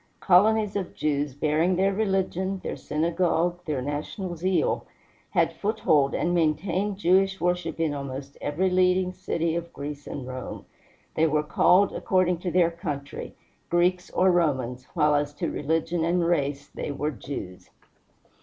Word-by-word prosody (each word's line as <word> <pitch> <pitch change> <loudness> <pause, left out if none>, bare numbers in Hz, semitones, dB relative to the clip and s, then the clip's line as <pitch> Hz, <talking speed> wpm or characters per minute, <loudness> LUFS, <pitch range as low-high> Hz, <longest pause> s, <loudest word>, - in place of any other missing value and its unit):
Colonies 210 +3 +4
of 195 -3 -3
Jews, 145 -2 -1
bearing 155 +5 +1
their 195 +2 +2
religion, 195 -2 -1
their - - -3
synagogue, 170 +2 0
their 145 -5 -2
national 155 - -4
zeal, 185 +3 0 0.5
had - - +1
foothold 160 -10 +1
and 175 - 0
maintained 175 +5 0
Jewish 190 +1 +3
worship 180 -1 -1
in 160 -3 +1
almost 140 0 -6
every 180 +6 0
leading 185 0 +2
city 170 -3 -1
of 170 0 -4
Greece 145 0 -7
and 135 - -5
Rome. 130 0 -7 0.5
They 160 +1 +3
were 150 0 +1
called, 185 +5 +4
according 180 -2 +1
to 180 - -3
their 175 -1 +3
country, 145 -4 -6 0.3
Greeks 180 +1 +2
or 185 +1 +3
Romans, 130 -7 0
while 150 -3 +3
as 145 0 0
to - - -2
religion 165 +3 -1
and 170 +1 +1
race 145 -4 0
they - - -4
were 150 +2 -2
Jews. 120 -9 -8
170 Hz, 145 wpm, -26 LUFS, 145-185 Hz, 0.5 s, Colonies